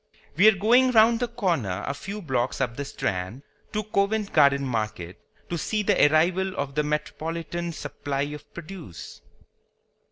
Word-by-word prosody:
We 190 +7 +6
are 220 - +7
going 240 +6 +4
round 225 +1 +5
the 245 - 0
corner 170 - -1
a 140 - -2
few 200 +7 -7
blocks 130 -4 -1
up 125 -3 -1
the 140 - -4
Strand, 110 -2 -3 0.3
to 215 0 -2
Covent 210 0 0
Garden 140 -2 +5
Market, 110 -7 -3 0.3
to 170 - -3
see 215 +6 -1
the 200 -7 +5
arrival 185 +4 +2
of 140 -1 -3
the 150 - +1
metropolitan 165 +3 -3
supply 145 -2 -4
of 150 +1 -7
produce. 170 - -10
155 Hz, 155 wpm, -25 LUFS, 135-200 Hz, 0.3 s, are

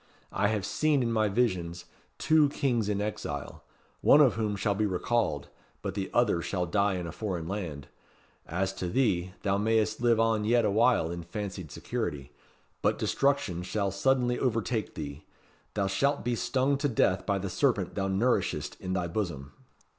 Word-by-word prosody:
I 100 +1 +1
have 105 -3 -1
seen 150 -4 +2
in 115 - 0
my 110 -1 +2
visions 90 -6 -1 0.3
two 155 -2 +4
Kings 120 -7 0
in 100 -1 0
exile: 75 -9 -5 0.4
one 145 - +7
of 140 -6 +6
whom 110 -2 -1
shall 100 +1 0
be 105 +2 0
recalled, 95 -5 -1 0.3
but - - -3
the 95 -1 -3
other 110 -8 +2
shall 90 0 -1
die 100 +2 +1
in 90 -1 -3
a 85 - -5
foreign 90 -6 -4
land. 85 -8 -5 0.6
As 95 +3 -1
to 90 - -1
thee, 95 -5 +1
thou 100 -1 +1
mayst 110 +1 +1
live 120 -2 +3
on 115 -1 +2
yet 115 +1 +3
awhile 105 -4 +3
in 85 0 -5
fancied 95 -1 -6
security. 70 0 -4 0.5
But - - +2
destruction 135 -11 0
shall 100 +2 -1
suddenly 125 +4 +1
overtake 115 -2 -1
thee. 75 0 -6 0.5
Thou 100 -2 +1
shalt 140 +10 0
be 120 - +1
stung 135 +3 +1
to 145 0 +1
death 95 -5 +1
by 100 -1 +2
the 100 +1 -3
serpent 100 -2 0
thou 95 -1 -1
nourishest 100 +6 0
in 95 - -3
thy 90 -2 0
bosom." 85 -7 -4
105 Hz, 170 wpm, -29 LUFS, 90-120 Hz, 0.6 s, one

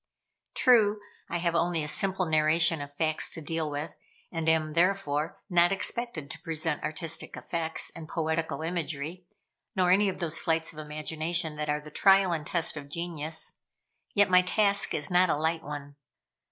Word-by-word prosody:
True, 215 -4 +4 0.3
I 170 - -1
have 170 -1 0
only 170 -1 +1
a - - -4
simple 190 +3 0
narration 160 0 +4
of 145 0 -7
facts 155 +1 -1
to - - -1
deal 160 0 -3
with, 145 +2 -5 0.3
and 165 -1 -1
am, 155 -1 +1
therefore, 170 -3 +1
not 175 -2 +4
expected 195 - -3
to - - -8
present 160 -1 -2
artistic 160 +1 -4
effects, 165 -1 -3
and 160 -1 -9
poetical 160 -2 -2
imagery, 165 +1 -4 0.5
nor 180 -2 +3
any 200 +2 +4
of 190 - -5
those 165 -2 +1
flights 165 -1 0
of 155 - -10
imagination 155 +2 -2
that 150 0 -3
are 150 0 0
the 150 0 -12
trial 195 +2 +5
and 155 -2 -3
test 170 -3 0
of 140 -1 -8
genius. 160 -1 -1 0.6
Yet 205 -1 +5
my 180 -1 +6
task 200 +2 +2
is 150 +5 -2
not 180 0 +4
a - - +2
light 160 +2 0
one. 145 -1 -8
165 Hz, 170 wpm, -28 LUFS, 155-180 Hz, 0.6 s, my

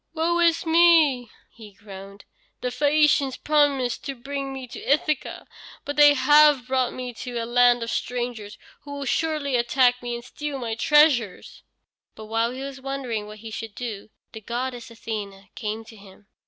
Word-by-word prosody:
"Woe 340 +2 0
is 335 -1 +2
me!" 320 -7 +4 0.2
he 215 -3 -14
groaned. 200 0 -12 0.4
"The 250 - -2
Phæacians 285 0 +2
promised 280 -5 +1
to 275 - -4
bring 275 +2 -5
me 265 -1 -7
to 245 - -10
Ithaca, 295 0 -1 0.4
but 285 - -4
they 290 -1 +7
have 295 -1 +5
brought 255 -1 0
me 250 -1 -6
to 245 +1 -7
a 230 - -2
land 245 0 +3
of 230 - -4
strangers, 240 -4 -4 0.2
who 285 - -10
will 280 -1 -5
surely 300 -1 -1
attack 245 +1 +2
me 240 -1 -4
and 235 - -8
steal 295 -2 -6
my 235 -3 -4
treasures." 255 - +2 0.5
But 220 - -10
while 225 +2 0
he 260 +2 -7
was 275 -1 -8
wondering 260 -6 -4
what 215 0 -10
he 220 - -7
should 220 -1 -7
do, 220 -4 -6 0.2
the 220 - -10
goddess 245 +2 -5
Athene 205 -4 -7
came 220 0 -5
to 225 - -14
him. 200 0 -17
250 Hz, 170 wpm, -24 LUFS, 225-285 Hz, 0.5 s, they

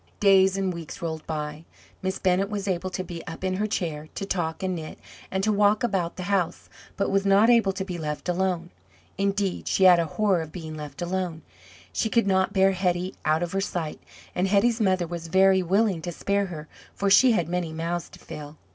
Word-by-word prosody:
Days 195 -1 +5
and 190 -2 0
weeks 170 -2 -8
rolled 160 -2 -5
by. 150 0 -4 0.4
Miss 190 0 -2
Bennett 190 +1 +1
was 205 -2 -3
able 185 0 -1
to 185 0 -4
be 170 -2 -7
up 165 +2 -7
in 185 0 0
her 210 +2 0
chair, 160 -7 -3
to 195 - -3
talk 175 -3 -2
and 185 -1 0
knit, 160 -2 -7 0.3
and 190 0 -2
to 215 - +3
walk 210 +1 +3
about 190 -7 0
the 185 - -5
house, 195 -3 -1 0.3
but 195 - 0
was 195 0 +2
not 200 +4 +5
able 230 -5 +4
to 190 0 -4
be 180 -3 -5
left 150 0 -4
alone. 180 -1 -1 0.5
Indeed, 195 -1 -1
she 190 - +2
had 180 -2 +8
a 170 - +1
horror 200 -5 +3
of 160 -1 -7
being 160 -3 -7
left 150 +2 -6
alone; 175 -2 -3 0.5
she 220 - 0
could 230 0 +2
not 190 -1 +2
bear 195 0 +4
Hetty 180 -1 -1
out 155 +2 +2
of 175 - -3
her 195 +1 0
sight, 170 -5 -3 0.3
and 180 +2 +1
Hetty's 220 +4 +3
mother 185 -3 +2
was 170 0 -6
very 190 +2 +4
willing 190 0 +1
to 175 - -4
spare 200 +3 0
her, 155 -4 -8 0.3
for 200 0 0
she 250 +4 +7
had 175 -7 +1
many 175 -1 -2
mouths 165 +1 -3
to - - -14
fill. 150 +1 -9
185 Hz, 215 wpm, -26 LUFS, 170-195 Hz, 0.5 s, had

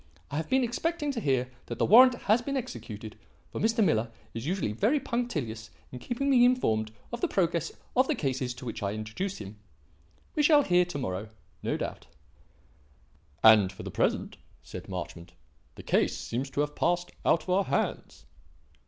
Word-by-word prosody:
I 145 - -2
have 160 - -3
been 265 0 +3
expecting 295 +5 -1
to 255 - -3
hear 130 -5 +1 0.2
that 120 - -5
the - - +2
warrant 250 +4 +8
has 215 +4 +3
been 275 +2 -2
executed, 110 - -6 0.4
for - - -4
Mr. 225 +1 +3
Miller 115 - +1 0.2
is 115 +4 -5
usually 180 - -1
very 220 - +2
punctilious 155 - -3 0.2
in 125 - -7
keeping 245 - -3
me 255 -3 +5
informed 110 - +2 0.2
of 240 - -4
the - - +2
progress 170 -3 0 0.2
of 255 +1 +4
the 310 - +1
cases 130 - -2
to 130 +1 -10
which 115 - -5
I 100 0 -1
introduce 110 - -4
him. 105 0 -9 0.7
We 300 - +1
shall 295 -1 +6
hear 180 -4 +3
to 175 -4 -6
morrow, 105 -5 -4 0.3
no - - -1
doubt." - - -5 1.4
"And, 105 -4 +7
for 95 - -10
the - - -6
present," - - 0 0.3
said - - -9
Marchmont, 85 -1 -6 0.4
"the - - -10
case - - +1
seems 130 +4 -3
to 140 - -1
have 150 0 -2
passed 175 +1 0
out 165 - +3
of 185 - -4
our 190 +1 +3
hands." - - -2
160 Hz, 180 wpm, -28 LUFS, -, 1.4 s, warrant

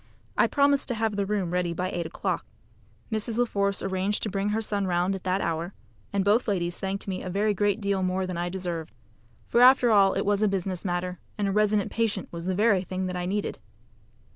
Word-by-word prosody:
I - - +4
promised 280 -1 +3
to 245 - -1
have 220 -1 0
the 200 -1 -1
room 195 -4 -1
ready 175 -1 0
by 185 +2 -2
eight 170 -2 -3
o'clock. - - -2 0.7
Mrs. 220 +1 -1
La 245 - +4
Force 200 -3 0
arranged 190 +2 -1
to 215 - -2
bring 200 +1 -1
her 215 +1 0
son 205 -3 -1
round 180 +2 +1
at 195 - -6
that 185 +1 +1
hour, 165 +3 -2 0.4
and 200 -1 0
both 215 +5 +3
ladies 175 -4 -1
thanked 195 +1 -3
me 190 -1 -3
a 185 - -5
very 205 +3 +1
great 205 +1 +1
deal 200 -2 0
more 185 +1 0
than 185 -1 -4
I 175 +1 -2
deserved; 175 -6 -4 0.5
for 235 - +2
after 250 -1 +7
all 200 -2 +5
it - - 0
was 205 0 +2
a 215 - +4
business 190 -2 -2
matter, 180 -1 -2 0.2
and 205 -1 0
a - - 0
resident 210 0 +2
patient 220 -4 -1
was 170 +1 -6
the 185 - 0
very 205 -1 +3
thing 185 0 -3
that 180 0 -3
I 180 0 -2
needed. 205 - -2
195 Hz, 225 wpm, -27 LUFS, 180-210 Hz, 0.7 s, after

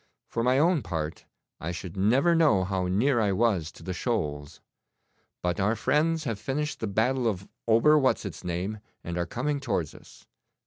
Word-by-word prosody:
For 115 - -2
my 125 +2 +3
own 165 +1 +3
part, 80 -5 -4 0.3
I 85 - -4
should 90 +1 -7
never 125 - +3
know 155 - +4
how 95 -1 -1
near 120 +8 +2
I 105 -3 +2
was 95 -6 +1
to - - -14
the 95 - -4
shoals. 75 - -3 0.8
But 90 +1 0
our 105 +4 +2
friends 155 +7 +1
have 115 -7 -3
finished 150 +6 -3
the 110 - -2
battle 120 +5 +1
of 95 -3 -2 0.2
Ober 135 +7 +5
what's 130 -5 +1
its 100 - -7
name, 90 +5 -3 0.2
and 85 - -4
are 85 -1 -1
coming 140 - -2
towards 100 - -2
us. - - -16
110 Hz, 180 wpm, -27 LUFS, 90-135 Hz, 0.8 s, Ober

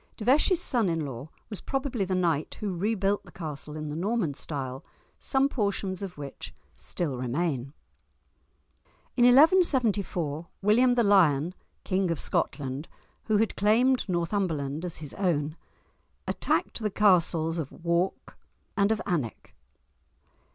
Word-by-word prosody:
De 215 - -6
Vesci's 305 +8 +4
son 240 - +1
in 165 -2 -1
law 135 +2 -7 0.2
was 210 - -6
probably 270 -5 -2
the 185 0 -1
knight 165 -4 0
who 200 -3 -3
rebuilt 200 +1 0
the - - -15
castle 150 -3 -7
in 155 -1 -5
the 150 - -4
Norman 190 -2 0
style, 135 -3 -4 0.4
some 270 0 +2
portions 200 -6 -2
of 190 -4 -6
which 140 -2 -8 0.2
still 145 -8 -4
remain. 135 +1 -2 1.4
In 245 - +4
1174, 240 - +3 0.2
William 245 +5 +4
the 240 - +3
Lion, 175 -6 +4 0.3
King 185 -1 0
of 165 - -1
Scotland, 140 +2 -2 0.4
who 215 -2 +2
had 220 0 +1
claimed 230 +4 +3
Northumberland 170 -5 -1
as 175 -2 -4
his 150 -3 -7
own, 155 -5 0 0.7
attacked - - -1
the 215 -2 -1
castles 170 -5 +2
of 145 -4 -4
Wark 170 +2 -2 0.4
and 200 +1 +3
of 220 - +1
Alnwick. 150 - -3
180 Hz, 135 wpm, -27 LUFS, 155-215 Hz, 1.4 s, Vesci's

